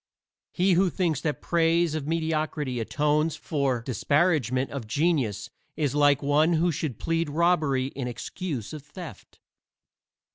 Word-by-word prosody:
He 185 +1 +2
who 185 +2 +3
thinks 170 -6 -1
that 150 -2 -3
praise 170 -1 +2
of 155 -2 -3
mediocrity 155 -5 -1
atones 150 +6 +1
for 135 -6 -1
disparagement 135 - +1
of 135 -6 -5
genius 140 - 0 0.3
is 145 -4 0
like 145 -1 +3
one 150 +4 +3
who 170 +2 +2
should 140 -6 -3
plead 165 -1 -1
robbery 155 -5 +1
in 135 -2 -5
excuse 130 - -5
of 155 - -6
theft. 150 - -11
150 Hz, 135 wpm, -26 LUFS, 135-165 Hz, 0.3 s, who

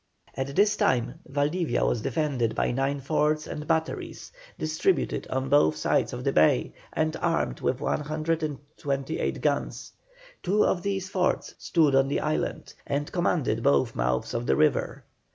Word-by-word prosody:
At 135 +1 -3
this 210 +1 +4
time 125 - +1
Valdivia 145 +1 0
was 120 - 0
defended 135 -6 -1
by - - +1
nine 135 +2 -1
forts 155 +2 +1
and 150 0 -6
batteries, 160 -1 -2 0.3
distributed 160 +4 0
on 130 +1 -2
both 130 - +4
sides 75 - +1
of - - -6
the - - 0
bay, 60 - +3 0.2
and 155 0 0
armed 165 -1 0
with 130 +1 0
128 150 -2 -2
guns. - - -1 0.5
Two 200 +3 +2
of 175 - +1
these 195 0 -2
forts 185 -1 0
stood 155 -5 +2
on 135 0 +4
the 140 - 0
islands, 155 0 -2
and 145 +1 -2
commanded 155 -10 0
both 70 -9 +3
mouths 60 +1 -1
of 115 +1 -2
the - - +3
river. 155 -1 +1
150 Hz, 150 wpm, -27 LUFS, 135-160 Hz, 0.5 s, this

